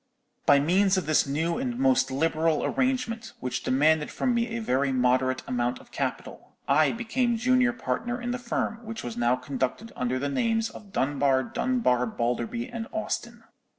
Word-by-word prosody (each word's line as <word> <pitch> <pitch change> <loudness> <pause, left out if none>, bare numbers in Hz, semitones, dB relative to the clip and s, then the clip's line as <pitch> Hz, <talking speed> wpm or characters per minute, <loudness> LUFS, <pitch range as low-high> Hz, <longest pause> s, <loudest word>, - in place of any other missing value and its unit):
"By 140 - +7
means 190 +6 +3
of 185 - -1
this 155 -1 +3
new 165 - -1
and 250 -2 -2
most 265 - +3
liberal 160 +3 +1
arrangement, 255 -4 -1
which 125 0 -3
demanded 150 +3 +2
from 250 - 0
me 235 0 +1
a 230 0 -4
very 140 - +1
moderate 130 0 +2
amount 120 0 -1
of - - -17
capital, - - -5
I 150 +2 +4
became 240 +1 0
junior 250 +1 +3
partner 245 0 -3
in 245 0 -3
the 250 - -3
firm, 235 -1 -3
which 225 0 -6
was 120 -2 -5
now 120 +1 +2
conducted 135 - -3
under 125 +1 -1
the 140 +2 -2
names 225 - 0
of 205 -2 -12
Dunbar, 135 -2 +1
Dunbar, 125 - +1
Balderby, 120 - -2
and 230 -2 -6
Austin. 235 +1 -4
170 Hz, 170 wpm, -27 LUFS, -, -, By